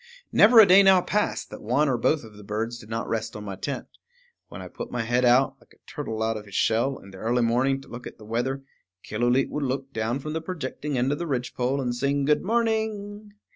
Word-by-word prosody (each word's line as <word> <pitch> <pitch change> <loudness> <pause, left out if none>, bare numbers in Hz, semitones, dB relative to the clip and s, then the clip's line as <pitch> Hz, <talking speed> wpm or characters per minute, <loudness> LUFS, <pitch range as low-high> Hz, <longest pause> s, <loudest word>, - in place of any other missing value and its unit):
Never 225 +2 +7
a 220 - +10
day 190 +1 +7
now 190 -1 +6
passed 210 +3 -1
that - - -9
one 125 +8 +1
or 130 - +2
both 145 +5 +1
of 110 -2 -13
the 105 - -12
birds 110 +3 -3
did 110 -3 -14
not 115 +1 -3
rest 110 0 -3
on 105 - -7
my 100 -2 -5
tent. 135 +9 -4 0.6
When - - -9
I - - -7
put - - -8
my 120 -2 -2
head 120 +2 +1
out, 125 +2 +4
like - - -24
a - - -38
turtle 110 0 -4
out 110 0 0
of 105 - -9
his 100 -2 -11
shell, 120 +7 +1
in 100 - -14
the 95 - -11
early 120 +3 +1
morning 130 +4 +2
to - - -16
look 120 +1 -8
at - - -11
the 105 - -14
weather, 125 +5 -2 0.4
Killooleet 120 +4 +1
would 150 - -2
look 135 +1 -3
down 110 +3 -1
from 150 +2 -6
the 160 - -2
projecting 150 -4 -4
end 125 +3 +1
of 145 - -2
the 170 - -3
ridgepole 125 0 -1
and 125 -2 -1
sing 140 +3 0
good 150 +1 +3
morning. 215 -1 -1
130 Hz, 245 wpm, -25 LUFS, 115-150 Hz, 0.6 s, a